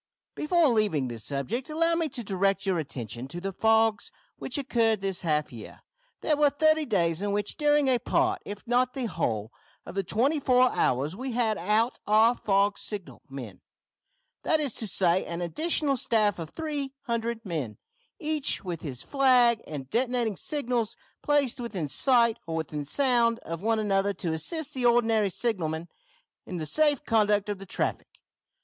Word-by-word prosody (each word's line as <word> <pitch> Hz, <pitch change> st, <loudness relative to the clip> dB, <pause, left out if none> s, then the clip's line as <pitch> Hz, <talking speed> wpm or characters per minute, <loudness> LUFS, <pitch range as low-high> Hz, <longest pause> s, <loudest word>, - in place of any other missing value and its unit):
"Before 335 Hz, +1 st, +2 dB
leaving 205 Hz, -, +1 dB
this 115 Hz, -2 st, -6 dB
subject 195 Hz, -, -3 dB
allow 330 Hz, +2 st, +2 dB
me 330 Hz, -2 st, 0 dB
to 245 Hz, -3 st, -4 dB
direct 195 Hz, -1 st, 0 dB
your 185 Hz, -3 st, +1 dB
attention 120 Hz, -4 st, -6 dB
to 170 Hz, +6 st, -6 dB
the 195 Hz, +2 st, -4 dB
fogs 220 Hz, +1 st, +2 dB, 0.3 s
which 260 Hz, -, -2 dB
occurred 230 Hz, -6 st, +1 dB
this 195 Hz, -1 st, -1 dB
half 150 Hz, -3 st, 0 dB
year. 110 Hz, -2 st, -10 dB, 0.4 s
There 305 Hz, -, +2 dB
were 295 Hz, 0 st, +4 dB
thirty 310 Hz, +2 st, +2 dB
days 170 Hz, -6 st, +1 dB
in 205 Hz, 0 st, -1 dB
which 205 Hz, 0 st, -1 dB
during 295 Hz, -1 st, +3 dB
a 255 Hz, -2 st, +3 dB
part, -, -, +1 dB
if 205 Hz, 0 st, -8 dB
not 250 Hz, +1 st, +1 dB
the 260 Hz, -3 st, -2 dB
whole, 115 Hz, -, -2 dB, 0.3 s
of -, -, -8 dB
the 195 Hz, +1 st, -1 dB
twenty 260 Hz, -, +1 dB
four 255 Hz, -2 st, +4 dB
hours 140 Hz, +7 st, 0 dB
we 255 Hz, +3 st, -5 dB
had 230 Hz, -2 st, +1 dB
out 215 Hz, +7 st, +1 dB
our 220 Hz, +3 st, +5 dB
fog 200 Hz, -2 st, +1 dB
signal 205 Hz, -4 st, -7 dB
men; 125 Hz, -9 st, -8 dB, 0.8 s
that 315 Hz, -, +2 dB
is 285 Hz, -6 st, -1 dB
to 220 Hz, -, -4 dB
say, 180 Hz, -1 st, +2 dB
an 170 Hz, 0 st, -5 dB
additional 290 Hz, -, 0 dB
staff 215 Hz, -6 st, +1 dB
of 165 Hz, -2 st, -6 dB
300 270 Hz, -, -4 dB
men, 150 Hz, -, -4 dB, 0.4 s
each 310 Hz, -4 st, -1 dB
with 175 Hz, -4 st, -5 dB
his 130 Hz, -5 st, -5 dB
flag 250 Hz, -4 st, +4 dB
and 140 Hz, -4 st, -6 dB
detonating 240 Hz, -3 st, 0 dB
signals, 245 Hz, -3 st, -2 dB, 0.2 s
placed 290 Hz, -5 st, +1 dB
within 200 Hz, -10 st, -3 dB
sight, 235 Hz, -, +3 dB
or 165 Hz, -, -3 dB
within 150 Hz, -2 st, -4 dB
sound 240 Hz, -, +2 dB
of 165 Hz, +1 st, -5 dB
one 225 Hz, +2 st, +1 dB
another, 200 Hz, -1 st, +1 dB
to 175 Hz, -3 st, -3 dB
assist 300 Hz, -, -2 dB
the 255 Hz, -, -2 dB
ordinary 225 Hz, -3 st, +3 dB
signalmen 170 Hz, -7 st, -2 dB, 0.6 s
in 180 Hz, -, -5 dB
the 160 Hz, -, -3 dB
safe 295 Hz, -, +2 dB
conduct 210 Hz, -2 st, +2 dB
of 205 Hz, -2 st, -3 dB
the 195 Hz, -, -10 dB
traffic. -, -, -2 dB
220 Hz, 170 wpm, -27 LUFS, 175-255 Hz, 0.8 s, our